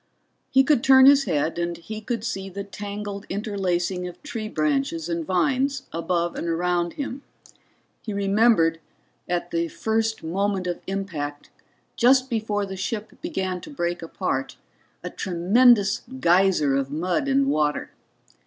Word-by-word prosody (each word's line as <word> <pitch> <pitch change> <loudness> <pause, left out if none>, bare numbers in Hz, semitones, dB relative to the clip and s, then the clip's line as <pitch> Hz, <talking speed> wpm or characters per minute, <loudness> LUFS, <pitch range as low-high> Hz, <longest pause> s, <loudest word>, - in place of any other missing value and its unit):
He 265 0 +5
could 275 -3 +2
turn 265 -1 +7
his 275 0 +7
head, 160 -2 -1
and 170 0 -2
he 215 +6 -7
could 230 0 -3
see 195 -4 -4
the 200 +2 -6
tangled 200 0 -6
interlacing 185 -3 -1
of 180 - -10
tree 230 -7 -5
branches 155 -1 0
and 170 -1 -2
vines 265 - 0
above 170 +1 -1
and - - -4
around 175 +1 0
him. 275 -1 -5 0.8
He 220 - -6
remembered, 200 -4 +3 0.5
at 175 0 -2
the 170 0 0
first 220 +3 -1
moment 190 +3 -1
of 175 -1 -3
impact, 160 -7 -4 0.5
just 255 +2 +4
before 210 -3 -1
the 190 -1 -6
ship 210 +3 -5
began 190 - -3
to - - -10
break 175 -11 -2
apart, 165 -5 -3 0.5
a - - -5
tremendous 200 +4 +3 0.2
geyser 175 - +3
of 135 0 -1
mud 180 - -1
and 275 0 +3
water. 150 - 0
195 Hz, 145 wpm, -24 LUFS, 170-225 Hz, 0.8 s, turn